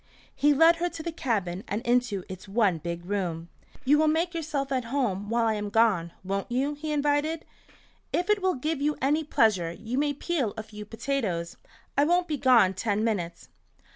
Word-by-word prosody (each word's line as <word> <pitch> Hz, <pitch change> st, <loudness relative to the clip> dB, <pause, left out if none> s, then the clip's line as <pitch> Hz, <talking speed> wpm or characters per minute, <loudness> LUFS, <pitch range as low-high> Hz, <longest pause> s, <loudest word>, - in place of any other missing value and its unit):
He 295 Hz, -, +4 dB
led 325 Hz, +4 st, +6 dB
her 350 Hz, +1 st, 0 dB
to 320 Hz, -, -8 dB
the 335 Hz, -, -3 dB
cabin 205 Hz, -, -2 dB
and 210 Hz, +4 st, -3 dB
into 240 Hz, -5 st, +1 dB
its 190 Hz, +1 st, -9 dB
one 195 Hz, -5 st, +2 dB
big 170 Hz, +2 st, -5 dB
room. 175 Hz, -4 st, -3 dB, 0.4 s
"You 295 Hz, +3 st, +5 dB
will 310 Hz, -, +4 dB
make 330 Hz, +3 st, +1 dB
yourself 295 Hz, -4 st, -3 dB
at 255 Hz, -3 st, 0 dB
home 230 Hz, -6 st, -1 dB
while 230 Hz, 0 st, +2 dB
I 220 Hz, -, +2 dB
am 210 Hz, -1 st, -3 dB
gone, 200 Hz, -6 st, +2 dB
won't 195 Hz, +4 st, -3 dB
you?" 270 Hz, +4 st, 0 dB
he 305 Hz, +1 st, -5 dB
invited. 295 Hz, +2 st, 0 dB, 0.7 s
"If 355 Hz, -, 0 dB
it 420 Hz, -1 st, +2 dB
will 375 Hz, 0 st, +1 dB
give 300 Hz, +3 st, -2 dB
you 295 Hz, +1 st, +1 dB
any 295 Hz, +4 st, +1 dB
pleasure 210 Hz, -, +2 dB
you 230 Hz, +9 st, -4 dB
may 290 Hz, 0 st, +1 dB
peel 280 Hz, -, -2 dB
a 220 Hz, -, -4 dB
few 210 Hz, -1 st, -10 dB
potatoes. 210 Hz, -8 st, -2 dB, 0.4 s
I 285 Hz, -, +4 dB
won't 350 Hz, +2 st, +2 dB
be 305 Hz, -3 st, -1 dB
gone 240 Hz, -8 st, +5 dB
ten 205 Hz, +2 st, -1 dB
minutes." 175 Hz, -7 st, -2 dB
240 Hz, 195 wpm, -27 LUFS, 200-295 Hz, 0.7 s, led